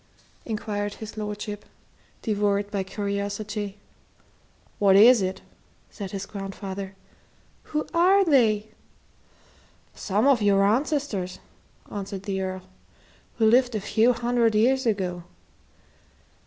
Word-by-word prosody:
inquired 205 Hz, -2 st, -3 dB
his 220 Hz, 0 st, -9 dB
lordship, 210 Hz, -1 st, -5 dB, 0.6 s
devoured 205 Hz, -2 st, 0 dB
by 200 Hz, -2 st, -1 dB
curiosity. 200 Hz, +1 st, -4 dB, 1.0 s
"What 195 Hz, -2 st, +5 dB
is 225 Hz, +3 st, +8 dB
it?" 190 Hz, 0 st, -3 dB, 0.5 s
said 200 Hz, -3 st, -6 dB
his 195 Hz, -1 st, -5 dB
grandfather. 195 Hz, -1 st, -6 dB, 0.7 s
"Who 300 Hz, 0 st, -2 dB
are 375 Hz, +4 st, +5 dB
they?" 220 Hz, -8 st, +3 dB, 1.2 s
"Some 210 Hz, +4 st, 0 dB
of 275 Hz, -5 st, +4 dB
your 200 Hz, -1 st, +4 dB
ancestors," 220 Hz, -, 0 dB, 0.5 s
answered 195 Hz, -1 st, -5 dB
the 195 Hz, -1 st, -2 dB
Earl, 185 Hz, -1 st, -4 dB, 0.7 s
"who 225 Hz, -, +3 dB
lived 245 Hz, +1 st, +4 dB
a -, -, 0 dB
few 220 Hz, +4 st, +3 dB
hundred 235 Hz, -1 st, +1 dB
years 255 Hz, +4 st, +3 dB
ago." 185 Hz, -5 st, -1 dB
210 Hz, 105 wpm, -25 LUFS, 195-230 Hz, 1.2 s, is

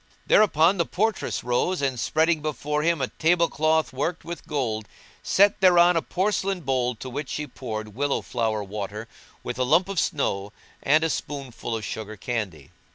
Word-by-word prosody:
Thereupon 185 Hz, -2 st, +4 dB
the 170 Hz, -, +1 dB
portress 215 Hz, +1 st, -1 dB
rose 125 Hz, +10 st, 0 dB
and 135 Hz, -3 st, -1 dB
spreading 160 Hz, +5 st, +2 dB
before 150 Hz, 0 st, -2 dB
him 165 Hz, -1 st, +1 dB
a 130 Hz, -, -1 dB
table 170 Hz, +1 st, +2 dB
cloth 155 Hz, -1 st, +1 dB
worked 160 Hz, +6 st, -2 dB
with 170 Hz, 0 st, -7 dB
gold, 115 Hz, -7 st, -2 dB, 0.3 s
set 200 Hz, +1 st, +3 dB
thereon 175 Hz, -1 st, +6 dB
a 165 Hz, -, +2 dB
porcelain 195 Hz, 0 st, -1 dB
bowl 130 Hz, -4 st, 0 dB
into 120 Hz, +3 st, -9 dB
which 135 Hz, +2 st, -5 dB
she 150 Hz, +6 st, -3 dB
poured 110 Hz, -6 st, -6 dB
willow 140 Hz, +5 st, 0 dB
flower 110 Hz, -3 st, -1 dB
water 105 Hz, +2 st, -6 dB, 0.4 s
with 120 Hz, +1 st, -5 dB
a -, -, +3 dB
lump 165 Hz, +8 st, +3 dB
of 195 Hz, -3 st, -1 dB
snow 100 Hz, -8 st, -1 dB, 0.3 s
and 155 Hz, +3 st, +3 dB
a 165 Hz, -, +1 dB
spoonful 135 Hz, -6 st, -4 dB
of 110 Hz, -, -6 dB
sugar 110 Hz, -1 st, -6 dB
candy. 105 Hz, -6 st, -4 dB
145 Hz, 170 wpm, -25 LUFS, 115-170 Hz, 0.4 s, thereon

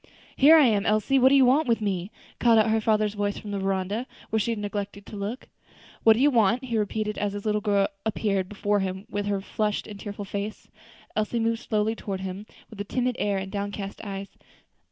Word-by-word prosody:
"Here 300 Hz, +4 st, +7 dB
I 310 Hz, -3 st, +7 dB
am, 210 Hz, -4 st, +2 dB
Elsie; 215 Hz, +6 st, +3 dB
what 260 Hz, +1 st, +6 dB
do 280 Hz, -, +5 dB
you 270 Hz, -2 st, +6 dB
want 275 Hz, +4 st, +3 dB
with 230 Hz, -1 st, +2 dB
me?" 195 Hz, -3 st, -2 dB, 0.3 s
called 230 Hz, -2 st, +5 dB
out 220 Hz, 0 st, +4 dB
her 220 Hz, 0 st, +2 dB
father's 215 Hz, -1 st, +2 dB
voice 205 Hz, -1 st, -2 dB
from 210 Hz, -, -7 dB
the 200 Hz, -, -2 dB
veranda, 195 Hz, +5 st, -1 dB, 0.2 s
where 220 Hz, -, +2 dB
she 215 Hz, -, -1 dB
had 230 Hz, -, -1 dB
neglected 205 Hz, -1 st, -5 dB
to -, -, -10 dB
look. 205 Hz, +5 st, -5 dB, 0.5 s
"What 225 Hz, -, +7 dB
do 220 Hz, -, -2 dB
you 290 Hz, +3 st, +5 dB
want?" 235 Hz, +1 st, +3 dB
he 235 Hz, -2 st, -3 dB
repeated, 210 Hz, 0 st, -2 dB
as 205 Hz, -1 st, -1 dB
his 205 Hz, +1 st, -6 dB
little 210 Hz, 0 st, +1 dB
girl 200 Hz, -2 st, +2 dB, 0.2 s
appeared 200 Hz, -4 st, -1 dB
before 205 Hz, 0 st, 0 dB
him 190 Hz, +1 st, -3 dB
with 205 Hz, 0 st, -2 dB
her 200 Hz, -1 st, 0 dB
flushed 210 Hz, +1 st, -2 dB
and 205 Hz, -2 st, -9 dB
tearful 205 Hz, -1 st, -6 dB
face. 200 Hz, +2 st, -5 dB, 0.5 s
Elsie 215 Hz, +2 st, 0 dB
moved 225 Hz, 0 st, 0 dB
slowly 215 Hz, 0 st, 0 dB
toward 195 Hz, -4 st, -5 dB
him, 190 Hz, +2 st, -6 dB, 0.2 s
with 210 Hz, -2 st, -7 dB
a -, -, -1 dB
timid 250 Hz, +4 st, -1 dB
air 205 Hz, -1 st, +1 dB
and 190 Hz, 0 st, -5 dB
downcast 200 Hz, 0 st, -4 dB
eyes. 195 Hz, -1 st, -6 dB
210 Hz, 220 wpm, -26 LUFS, 200-225 Hz, 0.5 s, Here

